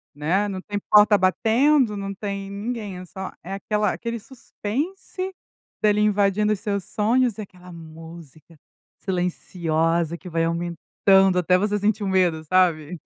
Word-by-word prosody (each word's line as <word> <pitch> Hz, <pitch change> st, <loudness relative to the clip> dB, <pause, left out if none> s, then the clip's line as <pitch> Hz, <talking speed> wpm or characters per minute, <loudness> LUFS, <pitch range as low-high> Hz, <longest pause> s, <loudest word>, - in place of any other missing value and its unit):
né, 175 Hz, +8 st, 0 dB
não 190 Hz, -2 st, -5 dB
tem 205 Hz, +1 st, -4 dB
porta 210 Hz, 0 st, +6 dB
batendo, 225 Hz, +5 st, +2 dB
não 195 Hz, 0 st, -4 dB
tem 200 Hz, -1 st, -5 dB
ninguém, 205 Hz, -1 st, -5 dB
é 180 Hz, -, -8 dB
só 190 Hz, +2 st, -7 dB
é 190 Hz, +3 st, -6 dB
aquela 210 Hz, 0 st, 0 dB
aquele 235 Hz, 0 st, -4 dB
suspense, 285 Hz, -, -5 dB, 0.5 s
dele 210 Hz, -1 st, +3 dB
invadindo 210 Hz, 0 st, +2 dB
os 195 Hz, -, -5 dB
seus 200 Hz, -3 st, -2 dB
sonhos, 230 Hz, +2 st, +1 dB
e -, -, -5 dB
aquela 180 Hz, -3 st, -12 dB
música 165 Hz, -1 st, -13 dB, 0.4 s
silenciosa 170 Hz, -2 st, -1 dB
que 180 Hz, -, -10 dB
vai 165 Hz, 0 st, 0 dB
aumentando 175 Hz, +3 st, +2 dB
até 180 Hz, +1 st, +3 dB
você 210 Hz, +2 st, 0 dB
sentir 210 Hz, +1 st, 0 dB
um -, -, -2 dB
medo, 175 Hz, -4 st, +1 dB
sabe. 175 Hz, -2 st, +1 dB
195 Hz, 145 wpm, -23 LUFS, 175-210 Hz, 0.5 s, porta